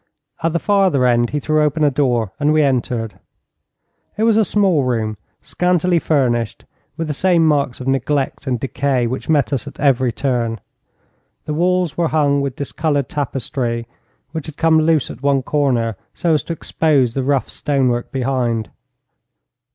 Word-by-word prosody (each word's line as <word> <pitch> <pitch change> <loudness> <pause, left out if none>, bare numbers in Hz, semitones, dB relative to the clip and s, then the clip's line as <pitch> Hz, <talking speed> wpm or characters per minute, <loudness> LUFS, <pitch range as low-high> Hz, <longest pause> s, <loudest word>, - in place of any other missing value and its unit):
At 165 0 +1
the - - +2
farther 190 -9 +2
end 120 -1 +3
he 150 - -2
threw 155 +1 +1
open 150 +1 +1
a 145 - +4
door, 125 -7 0
and 150 0 +2
we 155 0 +4
entered. 120 -5 -1 1.0
It 215 - 0
was 225 -1 +4
a 220 - +4
small 195 -7 +2
room, 115 -4 -1 0.3
scantily 180 -1 +1
furnished, 120 -8 0 0.3
with 165 - -2
the 155 - -3
same 175 +1 +2
marks 145 -5 +1
of 130 - -7
neglect 135 +1 -1
and 125 -2 0
decay 135 -1 0
which 130 +6 -4
met 145 -3 +2
us 130 - -2
at - - -10
every 130 -3 +2
turn. 115 -3 -1 0.9
The 150 - -3
walls 175 -1 +1
were 170 -1 +2
hung 145 -3 +2
with 140 -2 -3
discoloured 145 -1 -1
tapestry, 125 -4 -3 0.5
which 160 -2 -5
had 155 - -9
come 160 -1 +4
loose 155 -3 +2
at 125 - -11
one 140 -1 +1
corner, 125 -7 0 0.2
so 170 -2 +1
as 150 - +2
to 170 - -3
expose 145 -6 +1
the 135 - -1
rough 135 0 0
stonework 130 -4 -1
behind. 125 -4 -1
140 Hz, 165 wpm, -19 LUFS, 125-155 Hz, 1.0 s, a